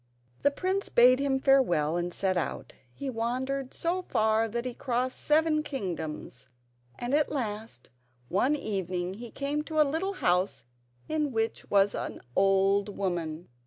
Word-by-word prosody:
The - - +5
prince 375 +7 -1
bade 250 +2 +6
him 275 -1 +1
farewell 175 - +3
and 175 0 -1
set 190 +1 0
out. 175 - -3 0.2
He 275 - -7
wandered 255 +3 -2
so 350 +2 -1
far 220 -8 +2
that 235 +2 -3
he 250 - -3
crossed 255 0 -1
seven 310 0 +3
kingdoms, 165 - -5 0.5
and 245 +2 -3
at 300 0 +2
last, 220 - -4 0.4
one 250 - +2
evening, 185 - -2
he 235 +4 -8
came 285 +4 -2
to 315 -1 -2
a 305 - +7
little 335 +7 -1
house 180 - 0 0.4
in 305 -2 0
which 225 -1 -2
was 200 0 +4
an - - -4 0.2
old 195 +1 +3
woman. 175 -4 -2
235 Hz, 150 wpm, -29 LUFS, 190-280 Hz, 0.5 s, a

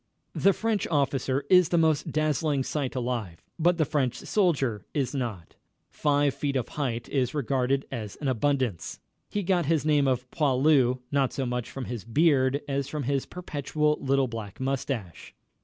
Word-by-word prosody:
The 195 - +4
French 220 0 -1
officer 140 -2 0
is 180 0 +5
the 170 - +2
most 160 -3 +2
dazzling 155 -2 +1
sight 140 -2 -3
alive, 120 -9 -3 0.2
but 170 +2 +3
the 160 - +2
French 140 -5 0
soldier 140 - 0
is 140 -1 0
not. 115 -11 -4 0.4
Five 145 -2 +2
feet 140 -2 -2
of 130 - -1
height 120 -5 -3
is 130 -1 -1
regarded 135 -1 0
as 110 -6 -5
an 145 - -4
abundance. 130 - -1 0.3
He 205 - -2
got 175 -4 +1
his 160 -2 +1
name 145 -3 +3
of 125 -1 0
"poilu" 135 -3 +3
not 140 -2 +1
so 135 - -2
much 125 -1 -3
from 135 -2 -6
his 120 -4 -5
beard 140 +2 +2
as 140 -1 -1
from 150 0 -4
his 135 +1 -1
perpetual 150 -3 -1
little 135 -1 +2
black 110 -4 -7
mustache. 130 - -4
140 Hz, 165 wpm, -27 LUFS, 125-150 Hz, 0.4 s, is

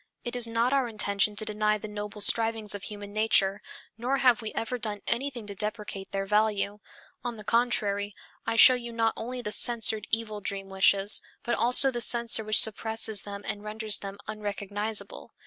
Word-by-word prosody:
It 240 0 -5
is 245 -1 +6
not 230 +3 0
our 270 -3 +1
intention 210 -2 0
to 215 - -3
deny 215 0 0
the 215 - -8
noble 210 0 -7
strivings 225 -1 +5
of 205 -1 -6
human 205 -1 -8
nature, 205 -2 +2 0.4
nor 255 +4 -1
have 250 -4 +3
we 220 - -4
ever 245 +2 -4
done 210 -2 -5
anything 245 -2 -3
to 205 - -7
deprecate 210 -1 -6
their 195 0 -3
value. 210 0 0 0.4
On 240 -2 -5
the 210 - -10
contrary, 205 -3 -1 0.3
I 225 - -3
show 255 - +8
you 240 -1 -4
not 225 -1 0
only 245 +2 -6
the 210 - -4
censored 220 -1 +2
evil 220 -2 -3
dream 195 0 -5
wishes, 195 +1 +3 0.2
but 240 - -2
also 250 +3 +5
the 240 -1 -3
censor 235 -1 +2
which 215 0 +4
suppresses 220 -1 +2
them 200 0 -9
and 205 - -5
renders 215 0 -2
them 195 0 -8
unrecognizable. 205 0 -5
215 Hz, 180 wpm, -27 LUFS, 205-230 Hz, 0.4 s, show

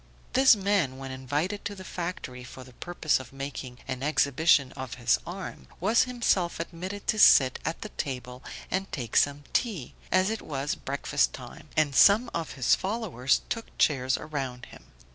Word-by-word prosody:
This 265 -1 +7
man 195 -10 0
when 135 0 -7
invited 145 +10 -2
to 205 - -3
the 190 - -9
factory 170 -9 -5
for 130 +1 -10
the 125 0 -15
purpose 165 +1 0
of 130 -3 -10
making 135 -2 -6
an 130 0 -4
exhibition 140 -1 +3
of 130 -3 -7
his 120 -2 +2
arm, 185 +2 -7
was 230 +3 +3
himself 235 -8 0
admitted 185 +4 -6
to 215 - 0
sit 130 -9 +7
at 165 - -3
the 215 - -6
table 125 - -5 0.3
and 195 +1 -2
take 120 -6 -5
some 145 0 +3
tea, 200 - -1 0.2
as 185 +3 +3
it 220 - -3
was 140 -1 -3
breakfast 140 +1 0
time, 140 +5 -10
and 150 -2 +3
some 215 - +6
of 165 - -3
his 130 -4 +2
followers 190 - 0
took 230 -1 -5
chairs 130 -3 +2
around 135 -5 -5
him. - - -15
150 Hz, 170 wpm, -28 LUFS, 130-190 Hz, 0.3 s, This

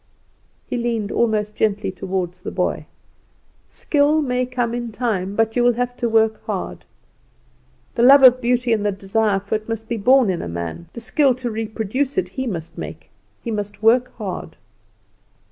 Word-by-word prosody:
He - - -3
leaned 230 -3 -2
almost 215 -2 0
gently 210 -2 0
toward 185 -1 -3
the 180 0 -8
boy. - - -2 0.8
"Skill 300 +1 +1
may 250 -2 0
come 245 -2 -2
in 240 -1 -4
time, 205 -4 -2
but 225 0 +1
you 245 - +3
will 245 0 +4
have 245 +1 -2
to 235 - -1
work 220 -1 +2
hard. - - -4 1.1
The - - -1
love 270 +3 +8
of 255 0 +8
beauty 245 -1 +1
and 215 -2 0
the 205 - +1
desire 195 +1 0
for 200 +1 -6
it 215 +1 -2
must 225 0 -4
be 235 - -2
born 245 0 +4
in 175 - -3
a - - -5
man; 85 -1 -5
the - - -7
skill 270 +2 +2
to 245 -2 -4
reproduce 225 - -2
it 375 - 0
he 260 -1 -4
must 170 -6 -5
make. 80 0 -8 0.3
He 230 - -3
must 205 0 -5
work 245 +3 +4
hard." 195 -5 -6
225 Hz, 180 wpm, -21 LUFS, 200-245 Hz, 1.1 s, love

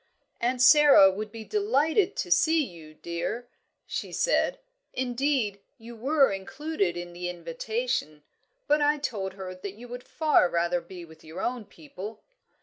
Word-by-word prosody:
"Aunt 245 +1 +1
Sara 275 -8 +8
would 210 +2 -5
be 225 0 -8
delighted 395 - +1
to 175 - -3
see 315 - +4
you, 160 - -11
dear!" 170 +10 -4 0.4
she - - -5
said - - +1 0.4
"indeed, 250 -4 0 0.2
you 230 +1 -11
were 275 +3 +3
included 195 - -2
in 175 0 -7
the 175 0 -4
invitation. 175 - -3 0.4
But 295 +1 +3
I 295 +1 +3
told 205 -9 -3
her 190 -1 -7
that 185 +2 -8
you 240 +3 -11
would 245 +1 -6
far 305 - +2
rather 170 +1 0
be 175 0 -10
with 160 -1 -17
your 160 +3 -9
own 245 -3 -2
people." 195 +4 -10
215 Hz, 150 wpm, -27 LUFS, 175-270 Hz, 0.4 s, Sara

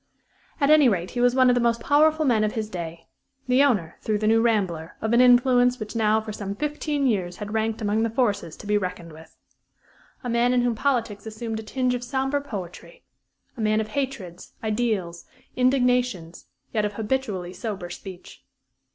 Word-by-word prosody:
At 280 +1 +3
any 300 -4 +7
rate, 180 -4 -2
he 245 - -2
was 245 0 +3
one 260 -1 +5
of - - +5
the 245 - +1
most 235 0 +1
powerful 310 +4 +3
men 230 -5 +3
of 215 - 0
his 220 -1 -4
day 170 -2 -6 0.4
the 255 +2 +4
owner, 205 - +1
through 215 -1 0
The 215 - -2
New 225 +1 +4
Rambler, 190 -8 0
of 220 +1 -1
an 240 - +6
influence 250 0 +4
which 215 +1 -7
now 220 -1 +3
for 215 -1 -7
some 200 -1 -5
fifteen 295 +1 -2
years 185 -8 0
had 210 0 -6
ranked 220 0 -1
among 210 +1 +1
the 230 - +1
forces 205 - -1
to - - -11
be 210 0 +2
reckoned 175 -3 -6
with. 160 +1 -15 0.9
A - - -4
man 240 +1 +2
in 245 -1 +2
whom 245 -1 +1
politics 230 -4 -1
assumed 220 0 -5
a - - -5
tinge 250 +3 -1
of 245 0 -3
sombre 270 +2 -1
poetry; 220 - -8 0.5
a 230 - -6
man 215 0 +2
of 215 0 -3
hatreds, 215 -9 -5
ideals, 210 -6 -2 0.3
indignations, 250 -9 +1 0.3
yet 215 -2 +1
of 210 0 -2
habitually 210 -5 -3
sober 185 -2 -5
speech. 185 0 -10
225 Hz, 190 wpm, -24 LUFS, 205-250 Hz, 0.9 s, any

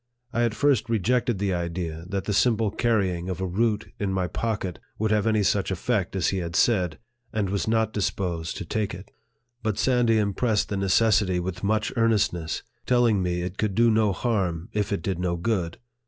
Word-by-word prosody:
I 120 - +1
at 115 -2 -1
first 140 -6 +2
rejected 115 +1 +1
the 100 -1 0
idea, 85 -1 -3
that 100 -1 -2
the 105 - -2
simple 110 -1 +2
carrying 95 -7 0
of 95 - -3
a 95 - -1
root 105 +3 -1
in 100 -2 -1
my 95 -1 0
pocket 100 -4 -3 0.2
would 110 0 0
have 105 0 +2
any 110 -2 +3
such 100 0 +1
effect 100 0 -1
as 95 -4 +1
he 95 - -1
had 85 -1 -4
said, 90 -9 +2 0.3
and 100 -3 -1
was 100 +1 -1
not 110 -1 +1
disposed 90 -5 -2
to - - -5
take 105 -4 -2
it; 95 +3 -12 0.5
but 110 -3 -1
Sandy 120 -3 +3
impressed 105 +1 +1
the 100 - -2
necessity 95 -1 +3
with 95 +1 -4
much 110 +1 0
earnest 115 -5 +3
ness, 80 -2 -4 0.2
telling 120 -5 +3
me 90 -1 -1
it 90 +2 -6
could 105 -3 0
do 115 +1 +5
no 110 -2 +3
harm, 90 -6 -1
if 105 -1 -1
it 100 - -1
did 95 -3 -2
no 90 -1 0
good. 85 -3 -1
100 Hz, 200 wpm, -25 LUFS, 90-110 Hz, 0.5 s, do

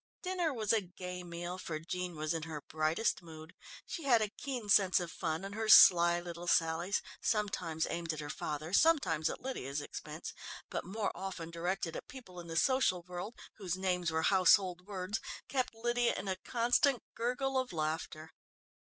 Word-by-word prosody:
Dinner 365 -3 0
was 220 -5 0
a 220 - +3
gay 180 -1 -7
meal, 175 +1 -6
for 165 -3 -4
Jean 180 +2 -4
was 155 +1 -1
in 165 - -2
her 155 -1 -5
brightest 160 +8 0
mood. 160 0 -11 0.3
She 335 - -5
had 245 -4 +5
a 215 -1 0
keen 245 0 -5
sense 195 -2 +5
of 175 -2 -4
fun 160 +4 -3
and 200 - -6
her 220 0 -2
sly 175 -4 +8
little 175 0 -7
sallies, 165 +4 +2 0.2
sometimes 195 -7 0
aimed 170 -1 -2
at 155 - -5
her 145 -1 -4
father, 155 +3 -4
sometimes 195 - +3
at - - -6
Lydia's 145 - -3
expense, 145 - -7 0.4
but - - -2
more 205 +3 -2
often 185 -4 -6
directed 170 0 -2
at - - -7
people 235 -9 -11
in 170 - -9
the 165 0 -4
social 185 -6 +3
world, 180 +6 -6 0.2
whose 185 -4 -3
names 180 -2 0
were 160 0 0
household 185 -1 +4
words, 200 +1 -3 0.3
kept 255 -3 -1
Lydia 240 +1 +1
in - - -5
a 190 - 0
constant 245 +5 +2
gurgle 250 +3 -1
of 255 - -3
laughter. 155 0 -3
180 Hz, 180 wpm, -33 LUFS, 165-220 Hz, 0.4 s, sly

